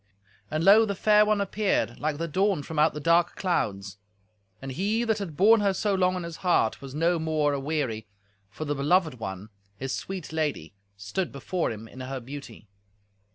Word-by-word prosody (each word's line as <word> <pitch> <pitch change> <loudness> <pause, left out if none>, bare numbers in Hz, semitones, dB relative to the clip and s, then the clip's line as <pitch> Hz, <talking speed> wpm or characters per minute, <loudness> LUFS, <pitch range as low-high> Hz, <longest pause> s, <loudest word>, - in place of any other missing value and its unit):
And 155 +1 -1
lo! 205 +5 +7
the 200 -2 -2
fair 210 +1 +4
one 215 -1 +2
appeared, 200 +1 0
like 150 -1 -1
the 165 +2 -2
dawn 190 -1 +1
from 160 +1 -4
out 155 0 +3
the - - -3
dark 170 +2 +3
clouds. 100 - -2 0.6
And 135 0 -6
he 205 - 0
that 220 -2 0
had 170 -7 -6
borne 220 +4 +6
her 200 -2 +1
so 205 0 0
long 185 -1 +2
in 180 - -4
his 170 -1 -7
heart 175 -11 +1
was 135 0 -9
no 165 +2 +2
more 155 -2 +1
aweary, 135 -6 -2 0.4
for 155 +10 -6
the 145 - -1
beloved 150 0 +1
one, 95 0 -6 0.3
his 135 0 -4
sweet 185 -5 -5
lady, 150 - -2 0.2
stood 105 - -3
before 170 +5 -2
him 110 0 -8
in 130 - -13
her 130 +1 -5
beauty. 125 -4 -10
160 Hz, 190 wpm, -27 LUFS, 135-190 Hz, 0.6 s, lo